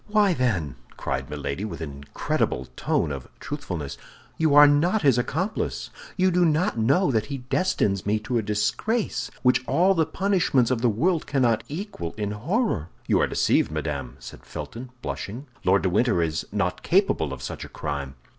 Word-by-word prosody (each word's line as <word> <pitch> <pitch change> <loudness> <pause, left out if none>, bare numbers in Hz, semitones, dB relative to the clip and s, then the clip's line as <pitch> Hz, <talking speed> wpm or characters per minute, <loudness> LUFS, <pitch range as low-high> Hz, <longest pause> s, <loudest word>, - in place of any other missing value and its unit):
"Why, 210 -3 +3
then," 90 - -1 0.2
cried 65 -1 -3
Milady, 75 +4 -4
with 105 - -5
an 80 -3 -5
incredible 70 -2 -2
tone 75 - 0
of 70 -2 -6
truthfulness, 90 - -5 0.4
"you 160 -3 +2
are 145 0 +10
not 160 +8 +3
his 135 -4 +5
accomplice; 180 - -2 0.3
you 185 0 +3
do 180 0 +3
not 160 -1 +2
know 140 - +3
that 110 -3 0
he 140 -1 -4
destines 105 - +1
me 105 +1 +1
to 115 +2 0
a - - 0
disgrace 110 - -1
which 125 0 +4
all 185 +3 +4
the 160 -4 +1
punishments 165 - +2
of 120 -3 0
the 120 - +4
world 160 - +1
cannot 120 -5 +2
equal 150 - -5
in 105 -1 -2
horror?" 120 - -1 0.2
"You - - +3
are - - +3
deceived, - - +2
madame," - - -4
said 65 -2 -11
Felton, 125 +2 -7
blushing; 120 +8 -5 0.2
"Lord 95 +2 +3
de 95 - +2
Winter 105 -3 +3
is 80 -1 -2
not - - -1
capable - - +2
of - - -7
such - - -5
a - - -9
crime." 70 -2 -4
120 Hz, 175 wpm, -25 LUFS, -, 0.4 s, are